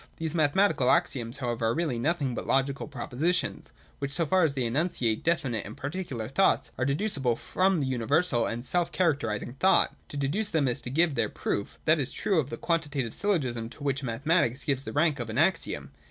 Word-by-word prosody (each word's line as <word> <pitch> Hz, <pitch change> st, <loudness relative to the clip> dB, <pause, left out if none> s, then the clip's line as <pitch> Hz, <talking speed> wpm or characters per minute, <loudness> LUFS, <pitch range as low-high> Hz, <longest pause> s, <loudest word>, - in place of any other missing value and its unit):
These 160 Hz, -2 st, -3 dB
mathematical 155 Hz, -3 st, +3 dB
axioms 120 Hz, -1 st, +1 dB
however 120 Hz, -4 st, -1 dB
are 115 Hz, -, +2 dB
really 155 Hz, -8 st, -1 dB
nothing 145 Hz, -1 st, 0 dB
but -, -, -5 dB
logical 135 Hz, +1 st, +1 dB
propositions, 145 Hz, -, -2 dB, 0.3 s
which, 140 Hz, 0 st, -3 dB
so 165 Hz, +1 st, +1 dB
far 185 Hz, +4 st, +3 dB
as 150 Hz, -4 st, +1 dB
they 130 Hz, -, 0 dB
enunciate 120 Hz, -3 st, 0 dB
definite 135 Hz, -10 st, 0 dB
and 105 Hz, -, -9 dB
particular 135 Hz, -7 st, -4 dB
thoughts, 170 Hz, +10 st, +2 dB
are 130 Hz, -, -1 dB
deducible 140 Hz, -, +1 dB
from 185 Hz, +7 st, +1 dB
the 140 Hz, -, 0 dB
universal 130 Hz, +1 st, +1 dB
and 120 Hz, +2 st, -3 dB
self 175 Hz, +4 st, 0 dB
characterising 135 Hz, -, -1 dB
thought. 190 Hz, -, +4 dB
To 145 Hz, -, -6 dB
deduce 165 Hz, +10 st, 0 dB
them, 150 Hz, -4 st, +1 dB
is 120 Hz, -, -1 dB
to -, -, -4 dB
give 160 Hz, +4 st, +2 dB
their 115 Hz, -5 st, 0 dB
proof. 100 Hz, -, -3 dB
That 155 Hz, 0 st, +4 dB
is 135 Hz, -2 st, -1 dB
true 195 Hz, -5 st, +1 dB
of 140 Hz, -3 st, -2 dB
the -, -, -5 dB
Quantitative 145 Hz, -8 st, -1 dB
syllogism, 130 Hz, -, -1 dB
to 140 Hz, -, -11 dB
which 140 Hz, -1 st, 0 dB
mathematics 130 Hz, +2 st, 0 dB
gives 135 Hz, -2 st, -1 dB
the -, -, -4 dB
rank 150 Hz, -1 st, +2 dB
of 120 Hz, -1 st, -4 dB
an 110 Hz, -, -4 dB
axiom. 145 Hz, -, 0 dB
140 Hz, 195 wpm, -28 LUFS, 120-165 Hz, 0.3 s, thought